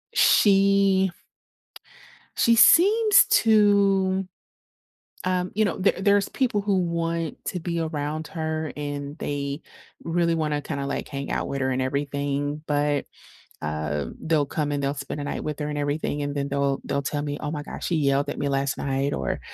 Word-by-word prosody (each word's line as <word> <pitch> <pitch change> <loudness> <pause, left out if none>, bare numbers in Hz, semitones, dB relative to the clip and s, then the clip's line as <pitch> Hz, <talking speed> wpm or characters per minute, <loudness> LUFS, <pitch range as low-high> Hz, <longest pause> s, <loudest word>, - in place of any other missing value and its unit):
she 195 -1 +4 1.3
she 235 - +4
seems 410 - +6
to, 200 -3 +3 1.0
um, 185 0 0
you 215 +2 +2
know, 195 - -1
there 195 +1 +2
there's 200 0 +3
people 245 -6 0
who 200 -1 +1
want 170 -2 -2
to 180 - -3
be 170 0 -2
around 155 0 -3
her, 160 -3 -3
and 145 0 -5
they 140 +1 -3 0.4
really 170 0 +1
wanna 150 -2 -1
kinda, 140 -2 -4
like, 140 - -4
hang 140 -1 -5
out - - -2
with 140 - -3
her 130 - +1
and 130 0 -1
everything, 140 +2 -2
but, 145 -1 +1 0.6
um, 75 -1 -3
they'll 160 -3 +1
come 145 +1 -2
and 145 -1 -1
they'll 140 - 0
spend 140 +1 -6
a - - -4
night - - -4
with 150 -1 -4
her 150 - -2
and 150 - -4
everything, 145 0 -2
and 145 0 -3
then 140 0 -1
they'll 140 -1 0
they'll 140 - -1
tell 145 +1 -3
me, 145 -1 -3
"Oh 150 - -3
my 150 -2 -4
gosh, - - -6
she 175 - 0
yelled 140 0 +1
at - - -5
me 145 - -1
last 135 -1 -1
night," 135 0 -1
or, 65 - -2
150 Hz, 175 wpm, -24 LUFS, 140-185 Hz, 1.3 s, seems